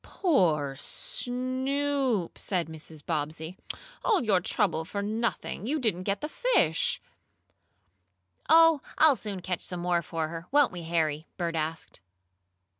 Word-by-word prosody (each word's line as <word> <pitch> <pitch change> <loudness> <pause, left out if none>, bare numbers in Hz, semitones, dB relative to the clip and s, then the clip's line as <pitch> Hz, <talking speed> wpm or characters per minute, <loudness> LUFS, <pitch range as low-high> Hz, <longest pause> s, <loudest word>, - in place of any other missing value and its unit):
"Poor 160 - +1
Snoop!" 255 - -1
said 180 -4 -1
Mrs. 160 -1 -9
Bobbsey. 160 +2 -3 0.4
"All 425 - +3
your 200 -5 +3
trouble 170 -3 +1
for 200 +5 -4
nothing! 220 0 -2
You 305 +4 0
didn't 200 -8 -1
get 200 0 0
the 300 - -2
fish." 310 - +2 1.5
"Oh, 330 -2 +7 0.2
I'll 310 -3 +6
soon 205 -4 -5
catch 180 -2 -2
some 180 -1 -3
more 175 -1 +1
for 160 -1 -3
her, 165 +1 -7
won't 290 -1 +4
we, 175 -2 -6
Harry?" 160 -2 -1
Bert 170 -2 -2
asked. 160 -4 -4
185 Hz, 130 wpm, -28 LUFS, 165-255 Hz, 1.5 s, Oh